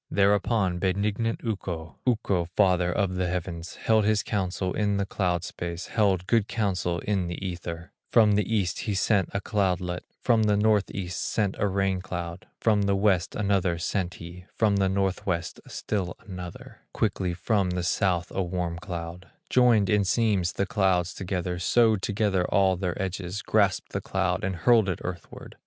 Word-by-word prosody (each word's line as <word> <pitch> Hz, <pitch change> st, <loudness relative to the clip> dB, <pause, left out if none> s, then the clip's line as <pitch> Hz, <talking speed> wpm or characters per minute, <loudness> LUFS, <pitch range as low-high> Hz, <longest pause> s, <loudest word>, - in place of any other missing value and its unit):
Thereupon 100 Hz, -2 st, +2 dB
benignant 100 Hz, +5 st, 0 dB
Ukko, 90 Hz, -7 st, -4 dB
Ukko, 100 Hz, -7 st, +1 dB
father 90 Hz, -2 st, +3 dB
of 95 Hz, +1 st, 0 dB
the 90 Hz, -1 st, 0 dB
heavens, 85 Hz, -1 st, -4 dB
Held 110 Hz, -1 st, +2 dB
his 110 Hz, +1 st, +2 dB
counsel 95 Hz, -2 st, -2 dB
in 105 Hz, -1 st, 0 dB
the 100 Hz, -, 0 dB
cloud 90 Hz, -4 st, -1 dB
space, 85 Hz, 0 st, -5 dB
Held 95 Hz, -5 st, +2 dB
good 110 Hz, 0 st, +2 dB
counsel 95 Hz, -5 st, -1 dB
in 100 Hz, -4 st, -1 dB
the 85 Hz, -, -4 dB
Ether; 85 Hz, -1 st, -6 dB, 0.2 s
From 110 Hz, -3 st, +6 dB
the 105 Hz, +1 st, +1 dB
East, 100 Hz, -6 st, 0 dB
he 105 Hz, -4 st, -2 dB
sent 95 Hz, -1 st, +2 dB
a 100 Hz, -, -1 dB
cloudlet, 90 Hz, -4 st, -1 dB, 0.2 s
From 115 Hz, -3 st, +3 dB
the 105 Hz, -1 st, +3 dB
North 105 Hz, -1 st, +3 dB
east, 90 Hz, -2 st, -4 dB
sent 100 Hz, -3 st, 0 dB
a 105 Hz, -, +2 dB
rain 95 Hz, -1 st, 0 dB
cloud, 90 Hz, -1 st, -6 dB
From 105 Hz, -3 st, +3 dB
the 100 Hz, -, +2 dB
West 95 Hz, -3 st, +1 dB
another 100 Hz, -4 st, +1 dB
sent 90 Hz, +1 st, -2 dB
he, 85 Hz, +2 st, -10 dB
From 105 Hz, -3 st, +2 dB
the 95 Hz, -1 st, +2 dB
North 95 Hz, 0 st, -1 dB
west, 85 Hz, -3 st, -2 dB
still 95 Hz, -4 st, -3 dB
another, 90 Hz, -3 st, -8 dB
Quickly 95 Hz, -4 st, -1 dB
from 100 Hz, +1 st, +1 dB
the 90 Hz, 0 st, -2 dB
South 90 Hz, 0 st, 0 dB
a 95 Hz, -, 0 dB
warm 90 Hz, -2 st, -2 dB
cloud; 85 Hz, -1 st, -6 dB, 0.2 s
Joined 120 Hz, -5 st, +5 dB
in 105 Hz, +1 st, +3 dB
seams 100 Hz, -3 st, +1 dB
the 100 Hz, -, 0 dB
clouds 95 Hz, -4 st, +1 dB
together, 90 Hz, -2 st, -3 dB
Sewed 110 Hz, +1 st, +3 dB
together 100 Hz, -3 st, +1 dB
all 95 Hz, -1 st, +3 dB
their 90 Hz, -1 st, -3 dB
edges, 95 Hz, +1 st, -3 dB
Grasped 100 Hz, -3 st, +1 dB
the -, -, -2 dB
cloud, 95 Hz, -1 st, -1 dB
and 95 Hz, 0 st, -1 dB
hurled 110 Hz, +2 st, +4 dB
it 90 Hz, -, -1 dB
earthward. 90 Hz, -2 st, -8 dB
95 Hz, 170 wpm, -26 LUFS, 90-105 Hz, 0.2 s, From